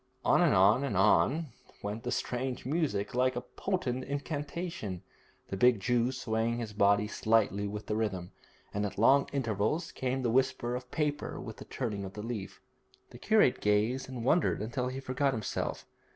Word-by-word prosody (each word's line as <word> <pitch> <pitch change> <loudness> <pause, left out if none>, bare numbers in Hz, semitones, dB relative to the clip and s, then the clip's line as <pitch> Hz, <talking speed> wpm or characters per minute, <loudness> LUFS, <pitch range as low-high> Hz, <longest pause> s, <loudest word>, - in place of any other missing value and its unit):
On - - +5
and 170 - +4
on 100 +8 +5
and 115 -9 -1
on 135 +9 +3 0.3
went 105 +2 -3
the 125 - -3
strange 125 0 -2
music, 135 -9 -1
like 130 +1 +2
a 125 - -2
potent 130 -11 -2
incantation, 145 - -4 0.5
the - - -3
big 120 +2 +4
Jew 120 +4 +1
swaying 115 -2 -1
his 115 -3 -5
body 100 0 +3
slightly 105 -2 +1
with 105 +1 -6
the 105 - -2
rhythm, 100 -5 -2 0.4
and 100 - -1
at 100 -1 -3
long 135 +6 +5
intervals 115 - -1
came 130 0 -2
the 120 - +1
whisper 130 -1 +1
of 125 0 -5
paper 150 0 -2
with 110 -3 -8
the - - -10
turning 105 -6 -3
of 95 0 -7
the 105 - -6
leaf. 105 -5 -5 0.5
The 120 - -12
curate 215 - +3
gazed 110 +6 +1
and 125 -3 -5
wondered 160 +5 +3
until 125 +4 -2
he 130 +1 -4
forgot 135 +1 0
himself. 110 -4 -3
120 Hz, 175 wpm, -31 LUFS, 105-135 Hz, 0.5 s, On